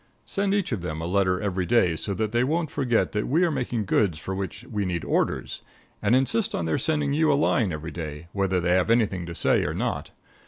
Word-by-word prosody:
Send 200 0 0
each 200 -7 -1
of 110 -7 -2
them 80 -3 -4
a 80 - -4
letter 90 0 +1
every 95 -3 -2
day 105 -9 +3
so 100 +4 -3
that 110 0 -1
they 120 +1 +2
won't 160 +3 0
forget 125 -5 +1
that 105 0 -1
we 160 +7 +3
are 170 - +2
making 120 -6 -2
goods 95 -3 +2
for 95 +5 -5
which 95 +3 -5
we 110 -5 -3
need 90 -3 -2
orders; - - -1 0.4
and 105 +4 +3
insist 195 - +1
on 85 - -2
their 80 -1 0
sending 150 -3 0
you 155 +1 +3
a - - +4
line 120 -8 +2
every 80 +1 -5
day, 75 -1 -6
whether 95 -2 0
they 90 0 0
have 90 +3 +3
anything 105 -7 +1
to 85 - -6
say - - +2
or - - -2
not. - - -2
105 Hz, 235 wpm, -25 LUFS, 90-130 Hz, 0.4 s, a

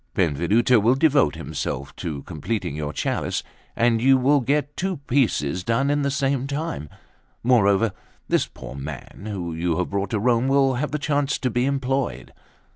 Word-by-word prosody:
Benvenuto 95 - +3
will 115 +5 +3
devote 140 - +3
himself 70 +2 -4
to 75 -4 -5
completing 90 0 -3
your 75 -1 -3
chalice, - - -2 0.3
and 115 -1 +2
you 135 +2 +5
will 140 +3 +4
get 145 +3 0
two 190 0 -2
pieces 90 - +1
done 115 +7 +1
in 145 0 +1
the 140 - +1
same 135 -1 0
time; 140 - -4 0.5
moreover, 115 -3 +4 0.4
this - - +1
poor 65 0 -10
man, 70 +8 -8
whom 90 -6 -4
you 85 -1 0
have 90 - -2
brought 100 0 -1
to 110 - 0
Rome, 120 +3 +2
will 135 -1 +3
have 135 +4 -1
the 150 - -2
chance 145 -1 0
to 130 - -1
be 120 +2 +1
employed." 135 -1 -1
120 Hz, 170 wpm, -23 LUFS, 90-140 Hz, 0.5 s, you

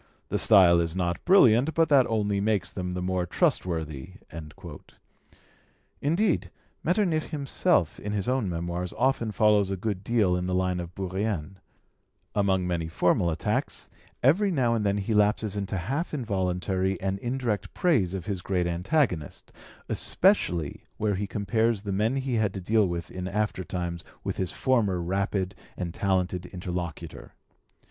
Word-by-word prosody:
The - - 0
style 90 -5 +6
is 85 0 -1
not 85 -2 -1
brilliant, 145 - +5
but 165 0 +3
that 135 -4 +5
only 105 -3 0
makes 100 -4 0
them 90 -1 -4
the 90 0 -3
more 90 -1 -1
trustworthy." 80 -2 -1 1.9
Indeed, 170 +6 +1 0.3
Metternich 175 -3 +1
himself 140 -4 0
in 105 - -5
his 100 -2 -2
own 125 -6 0
Memoirs 85 +1 -3
often 120 -2 +1
follows 105 -2 +3
a 95 - -2
good 100 -1 -3
deal 105 -5 +2
in 90 0 -2
the 90 - 0
line 90 -1 0
of 85 0 -7
Bourrienne: 95 -1 -3 0.7
among 95 -3 +1
many 85 -2 -1
formal 85 +2 +2
attacks, 80 -1 -2 0.3
every 180 +11 +4
now 130 -9 +1
and 110 -2 0
then 100 0 +1
he 100 +2 -1
lapses 105 0 +2
into 100 -1 -3
half 135 - -2
involuntary 95 -5 -1
and 95 0 -2
indirect 115 -5 -2
praise 110 - +2
of 90 -3 -5
his 100 -4 -3
great 90 -1 0
antagonist, 90 - -1 0.4
especially 90 - +2
where 105 -1 0
he 100 +1 -2
compares 110 +1 0
the 100 - -3
men 105 +6 +1
he 130 -3 -1
had 105 -3 0
to - - -3
deal 105 +2 +2
with 85 -3 -4
in 90 0 -5
aftertimes 90 -4 -3 0.2
with - - -3
his 95 -2 -1
former 105 -6 +1
rapid 95 +2 -1 0.2
and 85 -2 -4
talented 90 -2 -1
interlocutor. 85 -3 -6
95 Hz, 150 wpm, -27 LUFS, 90-115 Hz, 1.9 s, style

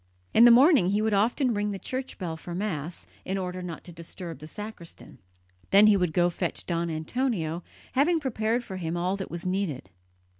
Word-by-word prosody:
In 235 - +7
the - - +9
morning 260 - +6
he 205 +3 +1
would 220 -1 +1
often 235 +5 +2
ring 205 0 -1
the 200 - -3
church 260 +6 -5
bell 170 -4 -4
for 170 +2 -7
Mass, 175 -5 -4 0.2
in 190 +1 -2
order 185 -1 -4
not 170 -3 -7
to 175 - -11
disturb 170 -1 -8
the 155 - -9
sacristan. 210 -3 -10 0.5
Then 200 +2 +7
he 215 -1 +6
would 180 -4 +1
go 175 +2 +3
to 175 - -5
fetch - - -2
Don 170 -1 -1
Antonio, 165 0 -2 0.3
having 320 +6 +3
prepared 235 -3 -1
for 190 -5 -7
him 170 -1 -3
all 180 +3 0
that 190 - -5
was 170 +1 -6
needed. 180 - -2
185 Hz, 200 wpm, -27 LUFS, 170-220 Hz, 0.5 s, the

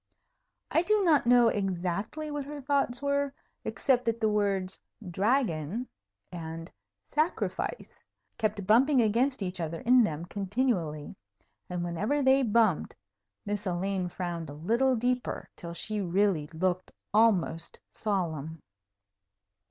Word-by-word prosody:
I 325 - +4
do 420 +3 +2
not 310 -8 +4
know 240 -1 +6
exactly 200 - -2
what 290 -1 -3
her 295 +1 -7
thoughts 275 -2 0
were, 280 0 +1 0.3
except 250 -3 +1
that 230 0 0
the 220 -1 +2
words 195 -3 0 0.3
"dragon" 205 - 0 0.4
and 165 -1 -7 0.4
"sacrifice" 320 +9 -1 0.5
kept 210 -2 -1
bumping 255 +7 +5
against 235 +2 +2
each 180 -1 -4
other 165 0 -4
in 250 +1 +6
them 165 -4 -2
continually; 195 - -1 0.5
and 180 -1 -2
whenever 210 - 0
they 265 +1 +5
bumped, 220 - +2 0.5
Miss 205 0 -3
Elaine 185 +1 -1
frowned 175 -3 -4
a - - -7
little 235 - +2
deeper, 245 +2 -1
till 170 0 -7
she 215 +3 -3
really 185 -4 +1
looked 180 +3 -1 0.2
almost 195 -6 +2
solemn. 165 -7 -2
205 Hz, 120 wpm, -29 LUFS, 175-250 Hz, 0.5 s, know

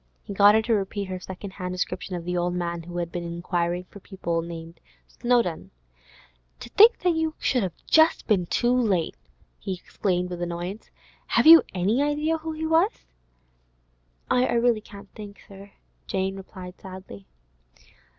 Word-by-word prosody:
He - - -7
got 205 +1 +6
her 220 - +3
to 230 - +1
repeat 200 -1 -2
her 185 0 -4
second 190 +2 -8
hand 180 -1 -5
description 180 0 -3
of 170 -1 -6
the 180 0 -2
old 175 0 0
man 170 -1 -3
who 175 +1 -8
had 170 -1 -3
been 175 - -4
inquiring 170 +1 -2
for 200 - -14
people 170 -4 -3
named 165 0 -9 0.3
Snowdon. 240 -9 0 0.9
'To - - -9
think 450 +3 +7
that 360 -1 +2
you 320 -1 -1
should 250 - +1
have 185 -4 -3
been - - -32
just 220 - +3
too 240 0 +2
late!' 205 -10 +1 0.5
he 190 - -4
exclaimed 180 0 -2
with 175 -1 -5
annoyance. 175 +4 -5 0.4
'Have - - +2
you 325 +1 +11
any 200 +8 +1
idea 300 +2 0
who 320 0 -5
he 315 +1 -4
was?' 330 +7 +1 1.3
'I 240 -2 +2
can't 200 -2 -13
think, 205 -1 -10
sir,' 200 0 -13 0.3
Jane 190 0 -1
replied 185 -1 -10
sadly. 185 - -11
195 Hz, 160 wpm, -25 LUFS, 175-240 Hz, 1.3 s, you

